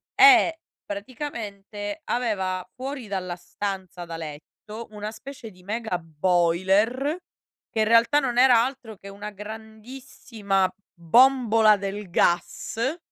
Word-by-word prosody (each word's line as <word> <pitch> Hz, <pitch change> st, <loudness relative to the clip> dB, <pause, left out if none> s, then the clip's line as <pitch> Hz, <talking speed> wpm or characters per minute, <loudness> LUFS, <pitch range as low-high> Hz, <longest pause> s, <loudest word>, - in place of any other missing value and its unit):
e 385 Hz, -5 st, +7 dB, 0.2 s
praticamente 205 Hz, 0 st, -6 dB
aveva 190 Hz, -7 st, -1 dB
fuori 265 Hz, -2 st, -6 dB
dalla 185 Hz, -3 st, -3 dB
stanza 185 Hz, 0 st, -6 dB
da 165 Hz, -1 st, -7 dB
letto 165 Hz, +8 st, -9 dB
una 210 Hz, 0 st, -6 dB
specie 230 Hz, +1 st, -10 dB
di 180 Hz, -1 st, -19 dB
mega 220 Hz, -1 st, -2 dB
boiler, 185 Hz, -, +1 dB, 0.5 s
che 225 Hz, -, -3 dB
in -, -, +3 dB
realtà 230 Hz, +6 st, +5 dB
non 250 Hz, -4 st, -2 dB
era 250 Hz, -3 st, +6 dB
altro 255 Hz, -4 st, -7 dB
che 200 Hz, -, -11 dB
una 205 Hz, +1 st, -7 dB
grandissima 220 Hz, -1 st, -4 dB, 0.3 s
bombola 225 Hz, +2 st, +5 dB
del 200 Hz, 0 st, -5 dB
gas 225 Hz, -, 0 dB
215 Hz, 115 wpm, -25 LUFS, 190-245 Hz, 0.5 s, e